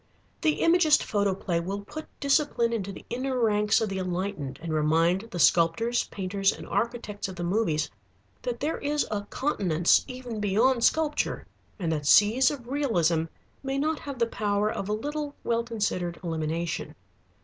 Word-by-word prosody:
The 310 - +1
Imagist 330 -2 +5
photoplay 195 -4 0
will 195 +4 -4
put 310 +10 -8
discipline 280 -5 +2
into 200 -3 -2
the - - -11
inner 255 +2 -2
ranks 210 -2 +3
of 220 - 0
the 195 -1 -3
enlightened 180 -7 -3
and 165 -1 -4
remind 165 +4 +2
the 180 - -6
sculptors, 175 +9 +3
painters, 195 0 0
and - - -9
architects 230 -4 -2
of 190 - -8
the 175 - -5
movies 170 -5 +1 0.5
that 240 -1 -3
there 305 +3 -1
is 295 +1 0
a 205 -1 -1
continence 180 - +2
even 250 -3 -6
beyond 230 +5 +2
sculpture 310 +1 +1 0.3
and 170 -6 -2
that 150 -2 -2
seas 220 - +6
of 265 -5 -6
realism 175 - +1 0.4
may 270 0 -2
not 305 +2 0
have 280 -2 -7
the 235 - +2
power 210 -2 0
of 195 - -4
a - - +1
little 290 +5 -3
well 235 0 +1
considered 205 -7 -2
elimination. 165 0 -3
210 Hz, 160 wpm, -27 LUFS, 175-255 Hz, 0.5 s, seas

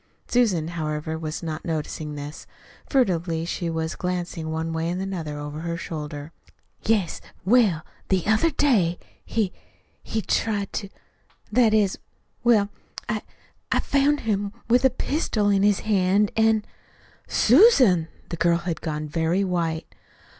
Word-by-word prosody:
Susan, 195 -10 +2
however, 155 -1 -3
was 160 +1 -5
not 160 -1 -4
noticing 155 -2 -3
this. 145 +1 -8 0.4
Furtively 170 - +1
she 170 0 -2
was 160 0 -2
glancing 175 -3 -3
one 160 +1 -2
way 165 +1 -1
and 180 +1 -2
another 175 -6 -4
over 145 +1 -6
her 170 +1 -3
shoulder. 150 -2 -6 0.5
"Yes. 210 -6 +1 0.2
Well, 200 -7 +4 0.3
the 190 -3 +2
other 220 +10 +3
day 220 - +2 0.3
he 215 -5 -1 0.5
he 220 -1 -3
tried 205 -3 0
to 200 - -3 0.6
that 240 -3 +4
is, 205 -3 +2 0.4
well, 220 -4 +4 0.4
I - - -1 0.5
I - - +3
found 285 +1 +2
him 205 -2 -1 0.2
with 245 +2 +4
a 265 - +6
pistol 245 -5 0
in 200 -1 +3
his 205 -1 +3
hand, 200 0 +2
an' 220 -1 +3 0.4
" - - -29 0.2
"Susan!" 245 - +5 0.2
The 170 - -4
girl 170 +1 +3
had 170 -1 -4
gone 155 -2 -3
very 165 +5 +1
white. 170 -4 -1
180 Hz, 140 wpm, -24 LUFS, 160-215 Hz, 0.6 s, a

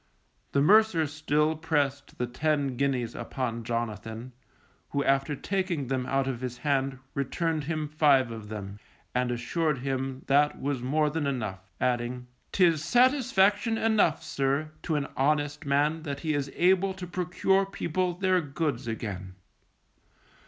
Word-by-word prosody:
The 140 - +3
mercer 205 -2 +5
still 150 +1 +1
pressed 145 -3 -1
the 125 - 0
ten 140 +1 0
guineas 130 -3 0
upon 120 -3 -4
Jonathan, 115 +1 -4 0.6
who 140 0 0
after 135 +2 +1
taking 185 -5 -2
them 130 -1 -1
out 135 0 +1
of 130 -2 -3
his 125 -1 -4
hand 135 -2 0 0.2
returned 155 +2 -1
him 155 -1 -2
five 145 -5 +3
of 110 -2 -8
them, 100 -1 -7 0.3
and 125 0 +1
assured 145 +6 0
him 135 0 -3
that 145 +2 +3
was 140 -2 -2
more 150 +4 +1
than 155 -2 -1
enough, 105 -8 -4
adding: 125 0 -1 0.3
_'Tis 170 -5 +4
satisfaction 230 - +3
enough, 215 -8 +2
sir, 140 +3 -1
to 160 - -1
an 145 -1 0
honest 145 +1 0
man 145 +3 +2
that 140 -3 -5
he 155 -1 0
is 140 -1 -2
able 190 +2 +3
to 185 -1 -6
procure 180 +2 +1
people 180 -1 -1
their 185 0 +2
goods 145 -4 -2
again. 100 -5 -5
145 Hz, 145 wpm, -28 LUFS, 130-160 Hz, 0.6 s, mercer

